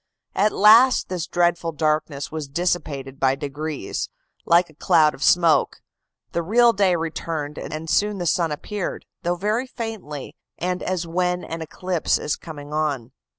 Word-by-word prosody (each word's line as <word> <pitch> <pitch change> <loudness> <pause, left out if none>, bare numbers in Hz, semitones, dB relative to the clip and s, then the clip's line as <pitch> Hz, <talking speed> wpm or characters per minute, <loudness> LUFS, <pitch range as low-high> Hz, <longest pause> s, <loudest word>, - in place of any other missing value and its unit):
At 210 +2 +2
last 230 +6 +6
this 175 -3 -3
dreadful 175 -1 +1
darkness 155 -2 -1
was 155 -2 -4
dissipated 140 -4 -2
by 135 0 +3
degrees, 145 -3 -4 0.4
like 170 +1 +5
a - - -21
cloud 155 0 +3
of - - -13
smoke; 170 -1 +3 0.5
the 170 - -1
real 235 +7 +4
day 195 -3 +3
returned, 160 -2 -4
and 155 +1 -6
soon 205 +5 +1
the 175 - -3
sun 165 0 +1
appeared, 190 +6 -4 0.2
though 175 +1 0
very 215 +8 -1
faintly, 220 - -6 0.2
and 180 +1 -2
as 185 -2 -2
when 180 +1 -1
an 165 0 -6
eclipse 175 +2 -1
is 150 - -2
coming 150 -2 -9
on. 145 -6 -1
165 Hz, 150 wpm, -23 LUFS, 150-185 Hz, 0.5 s, last